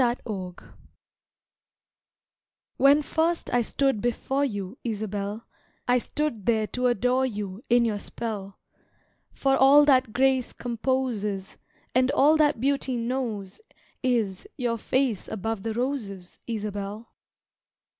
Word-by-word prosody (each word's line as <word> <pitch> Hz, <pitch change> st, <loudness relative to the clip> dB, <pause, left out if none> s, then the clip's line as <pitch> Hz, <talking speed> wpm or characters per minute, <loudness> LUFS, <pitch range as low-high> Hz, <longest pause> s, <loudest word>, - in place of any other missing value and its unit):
Isabel 215 Hz, -7 st, -2 dB, 2.2 s
When 285 Hz, +2 st, +5 dB
first 330 Hz, +1 st, 0 dB
I 245 Hz, -, +4 dB
stood 265 Hz, -1 st, 0 dB
before 265 Hz, +3 st, 0 dB
you, 205 Hz, -3 st, -4 dB
Isabel, 210 Hz, -1 st, -3 dB, 0.4 s
I 250 Hz, 0 st, +4 dB
stood 240 Hz, -6 st, -3 dB
there 220 Hz, -2 st, +3 dB
to 250 Hz, 0 st, +1 dB
adore 250 Hz, +3 st, +2 dB
you, 205 Hz, -2 st, -5 dB
In 240 Hz, 0 st, +5 dB
your 210 Hz, -3 st, -1 dB
spell; 200 Hz, -3 st, -5 dB, 0.7 s
For 270 Hz, -1 st, +1 dB
all 280 Hz, +2 st, +7 dB
that 260 Hz, -5 st, +4 dB
grace 260 Hz, +1 st, +2 dB
composes, 230 Hz, -5 st, -2 dB, 0.4 s
And 255 Hz, +1 st, +3 dB
all 295 Hz, +3 st, +5 dB
that 295 Hz, -5 st, +3 dB
beauty 270 Hz, -1 st, 0 dB
knows 230 Hz, -, -3 dB, 0.4 s
is 235 Hz, -, 0 dB
Your 235 Hz, -4 st, -1 dB
face 255 Hz, -4 st, 0 dB
above 220 Hz, 0 st, -3 dB
the 220 Hz, +1 st, -3 dB
roses, 225 Hz, -8 st, -4 dB
Isabel. 210 Hz, -1 st, -5 dB
235 Hz, 115 wpm, -26 LUFS, 210-265 Hz, 2.2 s, all